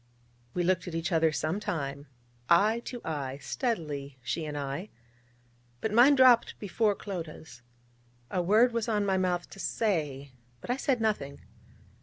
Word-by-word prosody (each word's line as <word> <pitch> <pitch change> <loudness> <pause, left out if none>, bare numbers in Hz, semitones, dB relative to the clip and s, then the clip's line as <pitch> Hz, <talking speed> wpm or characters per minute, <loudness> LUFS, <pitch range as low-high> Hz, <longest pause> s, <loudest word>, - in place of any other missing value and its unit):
We 175 - +1
looked 185 +1 +1
at 170 - -5
each 165 +3 -2
other 160 -1 +3
some 155 +5 -1
time 140 -7 -4 0.4
eye 210 +7 +5
to 245 -2 -6
eye, 140 -4 -3
steadily, 145 - -3
she 160 +6 -2
and 150 -1 -5
I: 140 +8 -4 0.9
but 215 - -2
mine 250 +6 +7
dropped 255 -3 +5
before 210 +1 0
Clodagh's. 160 - -7 0.7
A 180 - +1
word 215 +7 +4
was 230 0 -1
on 210 -2 +1
my 190 -1 +1
mouth 180 -1 0
to - - -11
say, 150 - -1 0.3
but 240 - -4
I - - +2
said 265 -3 0
nothing. 145 -11 -1
180 Hz, 155 wpm, -29 LUFS, 150-215 Hz, 0.9 s, mine